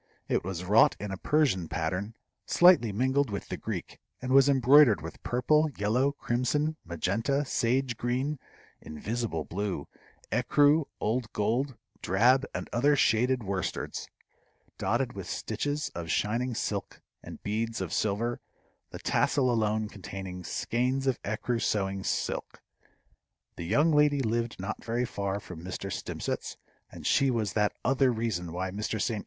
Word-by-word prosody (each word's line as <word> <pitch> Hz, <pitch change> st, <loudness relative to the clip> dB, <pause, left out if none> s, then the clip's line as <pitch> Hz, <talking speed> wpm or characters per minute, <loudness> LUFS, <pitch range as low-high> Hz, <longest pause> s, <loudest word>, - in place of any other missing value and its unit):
It -, -, 0 dB
was 90 Hz, -1 st, -4 dB
wrought 105 Hz, +4 st, +5 dB
in 105 Hz, -1 st, -5 dB
a 95 Hz, -, -4 dB
Persian 135 Hz, -, +1 dB
pattern 90 Hz, +8 st, -3 dB, 0.3 s
slightly 175 Hz, -, +6 dB
mingled 130 Hz, +5 st, +1 dB
with 100 Hz, -1 st, -5 dB
the -, -, -2 dB
Greek, -, -, -6 dB, 0.2 s
and 130 Hz, 0 st, -4 dB
was 135 Hz, +1 st, +6 dB
embroidered 135 Hz, -, +6 dB
with 80 Hz, +2 st, -9 dB
purple, 150 Hz, +6 st, +2 dB
yellow, 125 Hz, +7 st, +1 dB
crimson, 145 Hz, +5 st, 0 dB
Magenta, 110 Hz, -, -1 dB
sage 125 Hz, -1 st, 0 dB
green, 130 Hz, +4 st, -1 dB, 0.4 s
invisible 100 Hz, +1 st, -3 dB
blue, 95 Hz, -5 st, -3 dB, 0.4 s
écru, 145 Hz, +6 st, +4 dB
old 115 Hz, +1 st, -1 dB
gold, 120 Hz, +5 st, 0 dB, 0.2 s
drab, 125 Hz, +9 st, +3 dB
and -, -, -3 dB
other 145 Hz, +5 st, +4 dB
shaded 125 Hz, 0 st, +2 dB
worsteds, 95 Hz, -2 st, -3 dB, 0.7 s
dotted -, -, 0 dB
with -, -, -7 dB
stitches 145 Hz, +1 st, -2 dB
of 85 Hz, -1 st, -6 dB
shining 115 Hz, +8 st, 0 dB
silk 100 Hz, -2 st, -3 dB, 0.2 s
and -, -, -10 dB
beads 115 Hz, +2 st, -2 dB
of 95 Hz, -4 st, -4 dB
silver, 110 Hz, +3 st, 0 dB, 0.5 s
the -, -, -8 dB
tassel 130 Hz, -3 st, +2 dB
alone 110 Hz, -1 st, +1 dB
containing 95 Hz, -2 st, -7 dB
skeins 125 Hz, +8 st, -1 dB
of 130 Hz, -3 st, 0 dB
écru 115 Hz, +3 st, -2 dB
sewing 95 Hz, -2 st, 0 dB
silk. -, -, -3 dB, 0.9 s
The 85 Hz, -, -6 dB
young 150 Hz, -, +3 dB
lady 150 Hz, -2 st, +4 dB
lived 115 Hz, -1 st, -1 dB
not 100 Hz, +3 st, -5 dB
very 120 Hz, +2 st, -1 dB
far 100 Hz, -3 st, -3 dB
from 90 Hz, -4 st, -10 dB
Mr. 95 Hz, +2 st, -5 dB
Stimpcett's, -, -, -4 dB, 0.3 s
and -, -, -10 dB
she 135 Hz, -, +3 dB
was 110 Hz, -7 st, -1 dB
that 105 Hz, -1 st, +2 dB
other 135 Hz, 0 st, +3 dB
reason 110 Hz, -7 st, -2 dB
why 90 Hz, +2 st, -3 dB
Mr. 105 Hz, +2 st, -3 dB
St. 110 Hz, +1 st, 0 dB
115 Hz, 145 wpm, -29 LUFS, 100-130 Hz, 0.9 s, slightly